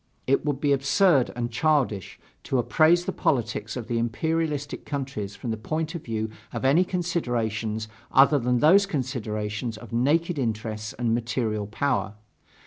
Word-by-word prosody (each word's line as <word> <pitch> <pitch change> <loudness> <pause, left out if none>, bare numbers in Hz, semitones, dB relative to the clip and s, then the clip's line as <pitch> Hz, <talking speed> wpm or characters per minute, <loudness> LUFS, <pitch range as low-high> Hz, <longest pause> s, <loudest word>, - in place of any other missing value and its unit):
It 135 - +2
would 145 -3 -1
be 145 -1 +2
absurd 140 +1 +3
and 120 -1 -3
childish 125 - 0 0.3
to 135 - 0
appraise 160 +7 +3
the 190 - -1
politics 125 - -1
of 120 - -5
the 120 -1 0
imperialistic 145 +5 -1
countries 130 -8 -4
from 120 - -4
the 110 - -2
point 155 +8 -3
of 170 - -6
view 110 -1 -2 0.2
of - - -4
any 150 +7 +5
considerations 115 - -2 0.2
other 140 +2 +6
than 125 0 +1
those 195 +6 +6
considerations 115 - -3
of 115 0 -11
naked 155 +7 +1
interests 110 -3 -3
and 120 -1 0
material 115 -3 -1
power. 105 -3 -1
125 Hz, 150 wpm, -25 LUFS, 110-150 Hz, 0.3 s, other